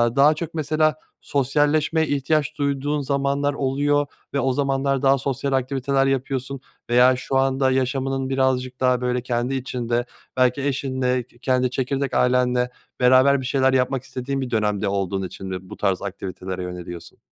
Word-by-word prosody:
daha 140 +2 +6
çok 155 +1 -6
mesela 155 0 +1 0.3
sosyalleşmeye 150 +3 +1
ihtiyaç 145 +1 0
duyduğun 145 +1 -1
zamanlar 140 +1 0
oluyor 145 +1 +1 0.3
ve 140 - +1
o 130 0 +1
zamanlar 135 0 0
daha 135 0 +4
sosyal 135 +1 -2
aktiviteler 135 +1 +1
yapıyorsun 135 0 -2 0.3
veya 125 +2 +5
şu 130 +1 -4
anda 135 0 +2
yaşamının 130 +1 -1
birazcık 130 -1 0
daha 125 -1 +2
böyle 125 0 0
kendi 120 +2 -1
içinde 120 -2 -2 0.3
belki 130 +2 +3
eşinle 130 -2 0
ke 120 0 -25
kendi 130 0 +1
çekirdek 135 +2 -2
ailenle 125 0 +2 0.3
beraber 130 +2 +5
bir - - -6
şeyler 130 0 +2
yapmak 130 0 +1
istediğin 135 +1 -4
bir 130 - -3
dönemde 105 -3 0
olduğun 95 -1 -1
için 95 +2 -9
mi 95 0 -6
bu - - -9
tarz 95 -2 0
aktivitelere 95 -1 -5
yöneliyorsun? 90 -1 -8
130 Hz, 150 wpm, -22 LUFS, 125-140 Hz, 0.3 s, daha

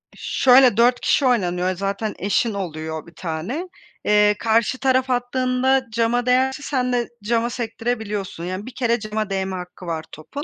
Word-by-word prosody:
Şöyle, 255 -3 +4
4 245 +1 +4
kişi 280 - +2
oynanıyor, 185 -6 +1
zaten 200 +3 -3
eşin 205 +4 +1
oluyor 160 -5 -5
bir 170 - -16
tane. 185 - -4 0.4
Eee, 210 0 +4
karşı 230 +2 +2
taraf 260 -1 +2
attığında 255 +1 +1
cama 235 +2 +1
değerse 265 +3 +2
sen 250 -3 -1
de 240 -1 0
cama 230 +2 +1
sektirebiliyorsun, 220 -6 -4
yani 185 +3 -4
1 255 - -9
kere 235 -2 +1
cama 215 0 -3
değme 190 -1 -2
hakkı 180 0 -9
var 165 -2 -3
topun. 280 - -7
225 Hz, 155 wpm, -22 LUFS, 190-250 Hz, 0.4 s, Şöyle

